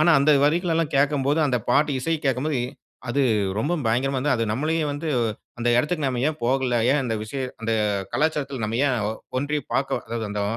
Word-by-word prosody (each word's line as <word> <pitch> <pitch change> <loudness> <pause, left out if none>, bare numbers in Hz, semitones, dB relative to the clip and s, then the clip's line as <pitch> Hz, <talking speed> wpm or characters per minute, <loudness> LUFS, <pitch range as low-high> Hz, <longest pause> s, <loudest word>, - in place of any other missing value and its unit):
ஆனா 155 +2 +5
அந்த 140 +2 +4
வரிகள்லாம் 165 0 +1
கேட்கும்போது 140 +1 +2
அந்த 130 -3 +1
பாட்டு 145 +4 +3
இசைக் 160 +3 -1
கேட்க்கும்போது 135 +1 0 0.5
அது 140 +4 +1 0.4
ரொம்ப 145 +10 0
பயங்கரமா 130 +5 +1
இருந்தது. 130 0 +1
அது 115 - 0
நம்மளையும் 155 +5 0
வந்து 145 +3 -4 0.5
அந்த 120 0 0
இடத்துக்கு 150 +4 0
நம்ம 125 -2 -1
ஏன் 155 - -4
போகல. 130 0 +1
ஏன் 145 +2 +3
அந்த 120 -3 -1
விசய 125 +6 -5 0.2
அந்த 115 0 -1 0.4
கலாச்சாரத்ல 140 -5 -1
நம்ம 110 +2 -2
ஏன் 130 -3 +1 0.4
ஒன்றி 145 +3 -1 0.2
பாக்க 135 0 0
அதாவது 115 -1 -3
அந்த 105 0 -2
140 Hz, 175 wpm, -24 LUFS, 125-150 Hz, 0.5 s, ஆனா